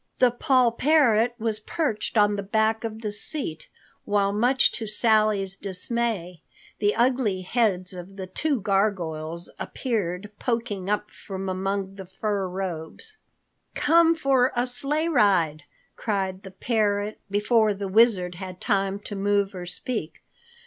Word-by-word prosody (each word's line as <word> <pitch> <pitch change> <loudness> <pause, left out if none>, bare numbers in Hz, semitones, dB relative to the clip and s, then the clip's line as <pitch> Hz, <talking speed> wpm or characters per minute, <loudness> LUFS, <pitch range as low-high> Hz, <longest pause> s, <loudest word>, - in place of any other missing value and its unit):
The 250 -1 +4
poll 255 -1 +3
parrot 240 -4 +3
was 220 -2 -1
perched 225 -2 -2
on 205 0 +4
the 200 - -2
back 220 +2 +1
of 220 -1 -5
the 210 -2 -3
seat, 205 - -2 0.3
while 200 -1 +1
much 245 +5 +3
to 225 - -3
Sally's 215 -3 +2
dismay 195 -3 -2 0.4
the 205 0 +2
ugly 235 -5 +1
heads 185 -3 0
of 180 +2 -9
the 190 -1 -5
two 270 +7 -1
gargoyles 175 -5 -1
appeared 205 -5 -3
poking 230 -6 -2
up 210 0 -1
from 195 -1 -7
among 195 +1 -2
the 190 -2 -8
fur 195 +1 -2
robes. 185 - -4 0.6
"Come 330 +1 +4
for 270 -4 +2
a 240 +1 +1
sleigh 280 +6 0
ride," 185 - +2 0.3
cried 190 -3 -2
the 190 - -10
parrot 205 0 -1
before 215 +2 +3
the 200 0 -4
Wizard 190 -3 +3
had 185 0 -8
time 195 -2 0
to 205 - -7
move 200 0 +1
or 180 -1 -7
speak. 180 -2 -4
205 Hz, 140 wpm, -25 LUFS, 190-235 Hz, 0.6 s, The